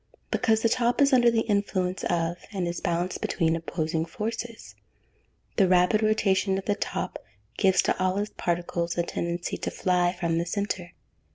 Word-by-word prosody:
_ - - -42
Because 220 -1 +2
the - - +5
top 240 0 +1
is 280 -1 +4
under 240 -2 +6
the 230 -1 +2
influence 200 -4 -1
of, 170 0 0
and 190 -4 -2
is 170 0 -4
balanced 175 0 -1
between 165 -2 +1
opposing 160 -1 -2
forces. 225 +7 -5 0.8
The 195 -4 +5
rapid 180 +4 +4
rotation 195 -3 +2
of 195 - -5
the 205 - +2
top - - -3 0.4
gives 190 -2 +3
to - - +1
all 185 +1 +1
its 205 +1 -2
particles 175 0 -2
a 170 - +2
tendency 170 0 -3
to - - -3
fly 180 -1 +1
from 165 -2 0
the 170 - -1
centre. 190 -2 -3
185 Hz, 175 wpm, -26 LUFS, 170-215 Hz, 0.8 s, under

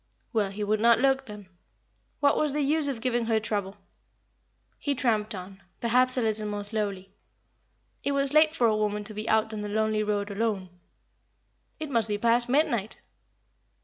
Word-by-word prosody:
Well, 210 -4 +1
he 205 +2 -5
would 210 +1 +1
not 230 +1 +5
look, 270 +1 +2
then. 210 -2 -10 0.7
What 285 -1 +4
was 300 -2 +1
the 300 - 0
use 300 +1 +1
of 260 -5 -3
giving 240 -1 0
her 225 -1 +2
trouble? 205 -2 -3 1.0
He 285 -1 -1
tramped 215 -5 0
on, 190 +1 -9 0.2
perhaps 250 +2 +3
a - - +2
little 215 -1 -1
more 205 0 -3
slowly. 200 -3 -3 0.9
It 280 - 0
was 275 0 +1
late 310 +1 +5
for 245 - +2
a 220 -2 +3
woman 210 -1 -1
to 215 +1 -4
be 215 +1 -4
out 220 0 +2
on 215 - -4
the 210 - -4
lonely 215 0 +1
road 205 -1 -1
alone. 200 -3 -2 1.1
It 310 -2 -5
must 230 -4 +2
be 210 -1 -1
past 235 +2 +2
midnight. 240 -7 +1
220 Hz, 180 wpm, -27 LUFS, 210-255 Hz, 1.1 s, not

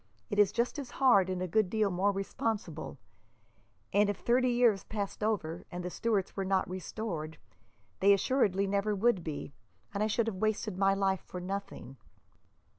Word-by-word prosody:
It 205 - 0
is 205 -2 +5
just 235 +5 -1
as 270 -4 -6
hard, 240 -9 +5
and 185 -1 -2
a - - -2
good 205 +2 +2
deal 215 -2 +1
more 190 +3 +2
responsible; 195 -4 -3 1.0
and 205 +1 +4
if 205 - -1
thirty 250 +3 +2
years 240 -5 +3
passed 205 -2 -5
over, 175 -6 -1
and 175 0 -6
the 180 - -3
Stuarts 210 -4 -1
were 195 - -1
not 190 0 +1
restored, 180 -4 -5 0.6
they 200 - +5
assuredly 200 -2 +2
never 200 +1 0
would 200 -3 +2
be, 150 -3 -5 0.4
and 200 - -2
I 215 - +3
should 220 +1 +1
have 225 -4 -3
wasted 215 0 -1
my 195 +1 +3
life 195 -1 +1
for 180 - -6
nothing." 180 -8 -6
200 Hz, 175 wpm, -31 LUFS, 185-220 Hz, 1.0 s, is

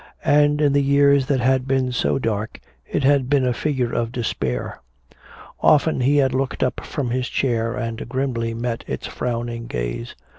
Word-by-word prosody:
And 145 0 +4
in 145 -2 +3
the 140 - +3
years 140 -1 +4
that 135 -3 +1
had 130 +1 +2
been 130 -1 +1
so 125 - 0
dark, 110 -4 -3 0.3
it - - -1
had 135 -2 +3
been 140 -2 +3
a 125 - +1
figure 130 -2 -1
of 115 -1 -1
despair. 85 - -3 0.8
Often 150 -2 +3
he 140 +4 +3
had 135 -3 +3
looked 130 0 -1
up 130 - -1
from 130 -5 -3
his 125 0 -1
chair 115 -3 0
and 115 -1 -4
grimly 120 -4 -2
met 115 0 -3
its - - -4
frowning 120 -1 -4
gaze. - - -4
130 Hz, 175 wpm, -22 LUFS, 115-140 Hz, 0.8 s, And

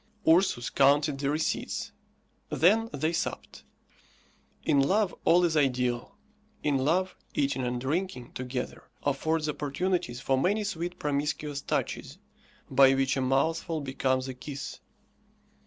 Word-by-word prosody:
Ursus 165 -7 +3
counted 140 +1 +3
the 140 0 0
receipts, 155 +2 -2 0.6
then 215 - +3
they 155 +4 -1
supped. 165 - -4 1.0
In 145 -3 +3
love 195 +7 +2
all 175 +1 +5
is 165 -2 0
ideal. 125 -4 0 0.5
In 145 -3 +2
love, 180 +7 +1 0.2
eating 140 -2 +1
and 125 -1 -1
drinking 135 -2 -2
together 125 0 -5
affords 155 +3 0
opportunities 150 -2 -1
for 135 0 +1
many 205 +8 +1
sweet 175 -3 -3
promiscuous 145 0 -2
touches, - - -3 0.5
by 135 -1 +6
which 135 0 +1
a 135 - 0
mouthful 160 +5 +1
becomes 130 -2 -1
a 130 - -4
kiss. 140 +2 -7
145 Hz, 125 wpm, -28 LUFS, 135-165 Hz, 1.0 s, by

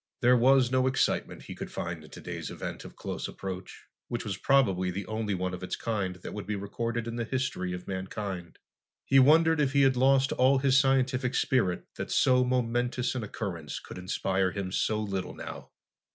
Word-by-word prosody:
There 125 0 +6
was 125 0 +4
no 130 0 +3
excitement 130 +1 0
he - - -8
could - - -7
find 85 -2 -4
in 75 - -14
today's - - -6
event - - -6
of - - -11
close - - -4
approach, 95 -1 -7 0.2
which 120 -1 -4
was 100 -3 -2
probably 95 -7 +2
the 95 +3 -4
only 110 -2 -2
one 90 0 -2
of 90 - -6
its 90 - -3
kind 100 -5 -2
that 90 - -8
would 105 -1 -6
be 105 - -1
recorded 115 +4 -3
in 115 0 -4
the 120 - -1
history 120 -7 -2
of 90 0 -6
mankind. 95 -2 -5 0.5
He 135 - +5
wondered 160 +3 +5
if 135 -2 +1
he 140 -1 +5
had 135 -1 +4
lost 135 +1 +4
all 130 +2 +4
his 130 -1 +3
scientific 130 -1 +2
spirit 120 - +1
that - - -4
so 125 -1 +4
momentous 125 0 0
an 130 - -3
occurrence 85 - -5
could - - -10
inspire 95 +1 0
him 95 -1 -4
so 110 +2 0
little 100 -3 -3
now. - - -8
115 Hz, 195 wpm, -29 LUFS, 95-130 Hz, 0.5 s, There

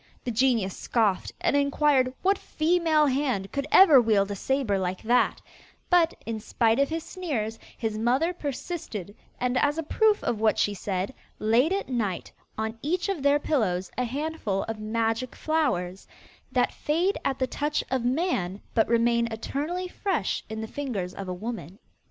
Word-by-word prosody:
The 245 - -2
genius 230 -5 +2
scoffed, 210 -6 0
and - - +2
inquired 280 -2 +3
what 390 +1 +3
female 315 -1 +2
hand 255 -8 0
could 280 0 -2
ever 310 -9 +8
wield 205 -3 +2
a - - -2
sabre 240 -3 0
like 185 0 -3
that; 240 +3 +2 0.5
but, 345 -2 +4
in 225 -1 -3
spite 225 +2 +1
of 280 - +3
his 325 0 -3
sneers, 245 - -3 0.2
his 220 -2 -2
mother 260 +10 +2
persisted, 275 - -5 0.2
and 250 0 +1
as 290 +1 +2
a 325 - -1
proof 430 +6 +2
of 225 -3 -1
what 220 -1 +3
she 205 - +2
said, 195 +3 -3 0.2
laid 235 +9 +3
at 395 +1 -1
night 220 -8 -2 0.3
on 220 +1 -3
each 355 +6 -1
of 380 -7 -2
their 285 +1 +4
pillows 200 - 0
a 250 - 0
handful 270 -6 -2
of 225 -1 -5
magic 225 +3 -1
flowers, 195 - -1 0.4
that - - +1
fade 345 +7 0
at 270 - 0
the 260 - +1
touch 295 +3 -1
of 260 -2 0
man, 245 - 0
but 220 - +3
remain 235 0 +2
eternally 295 +11 -3
fresh 360 - -2
in 220 0 -4
the 220 - -4
fingers 215 -10 -4
of 195 -1 -7
a 185 - -3
woman. 200 -4 -6
250 Hz, 170 wpm, -26 LUFS, 215-300 Hz, 0.5 s, ever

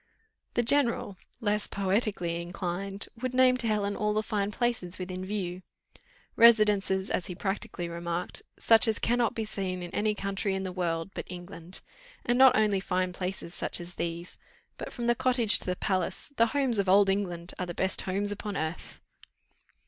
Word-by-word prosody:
The 240 - +3
general, 240 -6 +2 0.3
less 210 -1 +1
poetically 190 -4 -1
inclined, 180 +3 -3
would 255 0 -2
name 255 0 +5
to 235 -2 0
Helen 205 -2 0
all 210 0 0
the 215 - +1
fine 205 -2 -1
places 210 -6 -2
within 185 0 -5
view 185 -2 -4 0.7
"Residences," 210 -4 +4
as 180 - 0
he 180 - -5
practically 195 -1 -3
remarked, 170 +1 -3 0.2
"such 225 +1 +5
as 220 - +1
cannot 240 0 +1
be 225 - -2
seen 185 -4 -3
in 175 - -8
any 210 0 +1
country 195 0 -2
in 190 - -3
the 185 - -4
world 170 -1 -2
but - - -6
England; 180 0 -6 0.4
and 240 +1 +2
not 265 -1 +8
only 210 -2 +3
fine 185 -1 -1
places 180 -2 -5
such - - 0
as 175 +1 -8
these, 170 +1 -5 0.4
but - - -6
from 240 - -5
the 240 - +4
cottage 245 -3 +4
to - - -7
the 180 - 0
palace 185 - 0
'the 230 -2 +4
homes 260 -4 +1
of 195 -2 +1
Old 200 +1 +6
England' 185 -3 -1
are 180 - -2
the 175 - -6
best 190 0 0
homes 200 +2 -2
upon 205 0 -4
earth." 160 +2 -5
195 Hz, 180 wpm, -29 LUFS, 180-220 Hz, 0.7 s, not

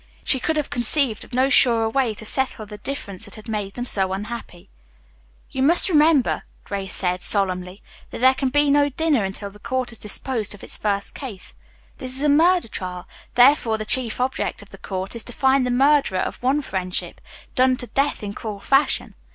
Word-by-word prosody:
She 265 - +1
could 315 +5 -1
have 300 - -2
conceived 240 -1 +4
of - - -16
no 255 +2 +2
surer 235 -4 +5
way 230 -1 0
to 220 - -8
settle 255 -2 0
the 210 0 -11
difference 220 -7 -4
that 205 - -7
had 215 -2 -12
made 210 -3 -4
them 245 - -4
so 190 -5 +2
unhappy. 210 -3 -7 0.8
"You 260 - -3
must 335 +8 +5
remember," 305 -4 +3 0.2
Grace 195 -2 -5
said 180 -1 -1
solemnly, 185 -1 0 0.3
"that - - -7
there 260 +2 +5
can 265 0 -2
be 290 +1 +2
no 290 0 +3
dinner 290 -4 +1
until 200 +1 -5
the 205 - -17
court 255 +2 -2
has 230 - -7
disposed 215 0 -1
of 205 - -16
its - - +1
first 200 -1 -2
case. 230 -10 -6 0.5
This 255 -1 -4
is 270 - -2
a 300 - +3
murder 340 +2 +4
trial, 180 -4 -7 0.3
therefore 245 -3 +4
the 215 - -5
chief 240 0 0
object 255 -4 -2
of 200 - -20
the 195 - -13
court 190 +3 -5
is 230 - -4
to 245 - -8
find 265 0 +2
the - - -1
murderer 270 -5 +2
of - - -5
one 270 +4 +1
friendship, 185 -6 -4 0.3
done 255 0 +3
to 245 - -3
death 275 -1 -1
in 200 -1 -5
cruel 210 -2 -6
fashion. 275 +7 +1
240 Hz, 200 wpm, -22 LUFS, 205-270 Hz, 0.8 s, surer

